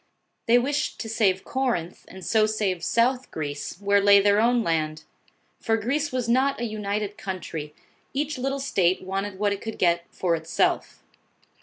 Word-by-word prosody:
They 235 +1 +6
wished 285 +4 -1
to 225 - -5
save 200 -4 +1
Corinth, 240 -11 -2
and 190 -1 -10
so 220 -1 +3
save 200 -5 -1
South 250 +5 +1
Greece, 145 +1 -5
where 200 0 +3
lay 200 0 +7
their 205 +1 +4
own 240 0 +3
land; 155 -2 -1 0.6
for 225 -1 +1
Greece 280 +7 -1
was 255 -2 -2
not 260 +3 +2
a - - -3
united 210 -1 -3
country; 165 -7 -6 0.4
each 290 0 -2
little 270 +2 -1
state 185 -10 +1
wanted 195 +1 -3
what 205 0 +1
it 200 - -6
could 225 -1 -6
get 170 -1 +2
for 175 -2 0
itself. 160 0 -1
205 Hz, 165 wpm, -25 LUFS, 185-240 Hz, 0.6 s, lay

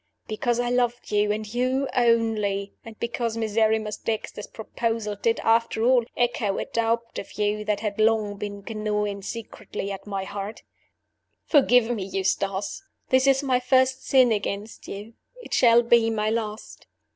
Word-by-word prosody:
Because 235 +2 -1
I 245 0 0
loved 245 -2 0
you, 210 0 +2
and 215 +1 -2
you 255 +3 +1
only; 220 -5 +1
and 225 -1 -11
because 235 -1 -2
Miserrimus 220 -1 +1
Dexter's 215 -1 -4
proposal 225 -1 -3
did, 225 +3 0
after 225 0 +2
all, 245 -1 +4
echo 240 -4 0
a - - -2
doubt 230 0 -1
of - - -9
you 210 0 -1
that 210 -1 0
had 210 -1 -3
long 215 -2 +2
been 205 0 -6
gnawing 210 -2 -2
secretly 210 -1 -6
at 195 +1 -7
my 195 -2 -3
heart. 200 +2 -6 0.8
"Forgive 245 -5 +4
me, 220 -5 -2
Eustace! 195 - -2 0.3
This 260 +1 +4
is 270 +1 +4
my 255 -2 +2
first 260 +1 +2
sin 255 -3 +4
against 205 0 -3
you. 205 +3 -8 0.3
It - - -8
shall 240 -1 +6
be 235 -1 +4
my 215 -1 0
last. 220 -1 -5
225 Hz, 155 wpm, -25 LUFS, 210-240 Hz, 0.8 s, shall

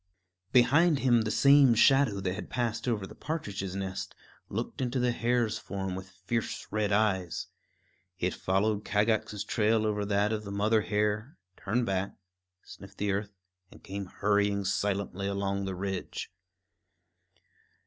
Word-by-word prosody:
Behind 145 +6 +5
him 125 -3 +3
the 110 - -2
same 140 -1 +6
shadow 135 -3 +4
that 90 -1 -1
had - - -7
passed 115 -1 -2
over 110 -5 0
the - - -11
partridge's 100 - -4
nest 95 -1 -4 0.3
looked - - -4
into 130 0 -1
the 125 0 +2
hare's 115 -2 0
form 95 -1 -4
with 95 0 -7 0.2
fierce 115 +2 -2
red 105 -1 0
eyes. 100 -4 +1 0.7
It 90 0 -1
followed 100 +2 0
Kagax's 105 -1 0
trail 110 +1 +1
over 105 -1 0
that 100 +1 +1
of 105 -1 -3
the 100 - -7
mother 105 +2 +2
hare, 105 +5 -1 0.2
turned 120 +5 -1
back, 95 -1 -2 0.5
sniffed 100 0 -13
the 105 0 0
earth, 100 +1 -3 0.3
and - - -17
came 100 0 -5
hurrying 100 0 +1
silently 100 0 -1
along 100 0 -1
the 95 -1 -3
ridge. 95 0 -4
105 Hz, 145 wpm, -29 LUFS, 100-115 Hz, 0.7 s, same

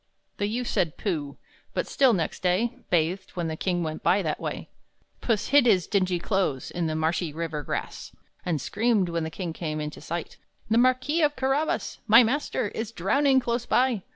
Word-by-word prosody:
The 205 - 0
youth 240 +4 -2
said 170 -9 0
"Pooh!" 150 -8 -3 0.4
but - - 0
still, 265 -3 +3
next 170 -7 -1
day, 185 +6 +1
Bathed, 180 +3 0
when 170 -2 -2
the 160 - -3
king 175 +1 -1
went 155 -1 -4
by 195 +1 +3
that 155 -2 -2
way. - - -5 0.5
Puss 220 -4 0
hid 280 -2 +5
his 185 -7 +4
dingy 185 -3 +1
clothes 175 - -1
In 175 -2 -1
the 155 - -2
marshy 160 +1 0
river 160 -1 -4
grass. - - -5 0.3
And 165 -4 -1
screamed, 215 - +1
when 170 -1 -1
the 160 - -3
king 170 0 -5
came 155 -2 -4
into 150 0 -5
sight, 165 +2 -5 0.3
"The 225 - +5
Marquis 255 +6 +2
of 295 -1 +2
Carabas 270 +4 -1
My 230 +3 +8
master 240 -3 -1
is 225 +1 -5
drowning 265 +8 +3
close 240 -1 -2
by! 250 -5 +2
190 Hz, 185 wpm, -26 LUFS, 165-240 Hz, 0.5 s, My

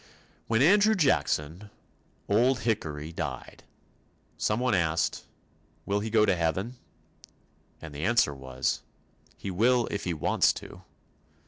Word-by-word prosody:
When 115 +3 +2
Andrew 205 +6 +5
Jackson, 105 - 0 0.6
"Old 120 +5 +2
Hickory," 80 -9 -2
died, - - -6 0.7
someone 120 +3 0
asked, 85 -3 0 0.6
"Will 100 +1 0
he 110 +2 -4
go 110 -1 +4
to 100 - +2
Heaven?" 95 +9 -2 1.0
and 80 -2 -10
the 75 +2 -6
answer 115 -9 +3
was, 65 -2 -3 0.6
"He 95 - -5
will 120 +6 +3
if 105 - -4
he 90 -2 -1
wants 75 - +2
to." - - -10
100 Hz, 120 wpm, -28 LUFS, 80-120 Hz, 1.0 s, Andrew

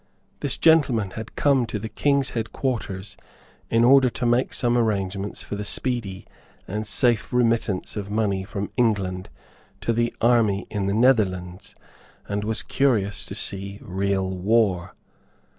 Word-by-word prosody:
This 140 - -1
gentleman 130 - +3
had 110 +2 -8
come 135 -5 +2
to 110 - -3
the 110 +2 -5
King's 140 +4 +1
headquarters 110 -4 -4 0.5
in 115 0 +3
order 130 +1 +6
to 120 +1 -4
make 120 +2 +2
some 120 -1 +1
arrangements 100 -3 -1
for - - -5
the 105 - -4
speedy 105 -3 -2 0.4
and 105 +3 -3
safe 120 0 +1
remittance 115 -5 0
of 100 -2 -5
money 100 -3 0
from 100 0 -5
England 95 -6 0 0.5
to 115 - 0
the 120 +1 +1
army 110 -4 +2
in 100 -2 -2
the 100 - 0
Netherlands, 100 -6 +1 0.5
and 100 0 -2
was 110 +1 -1
curious 105 -8 0
to - - -6
see 100 +1 -2
real 95 -2 -1
war. 95 -1 +1
105 Hz, 140 wpm, -24 LUFS, 100-120 Hz, 0.5 s, order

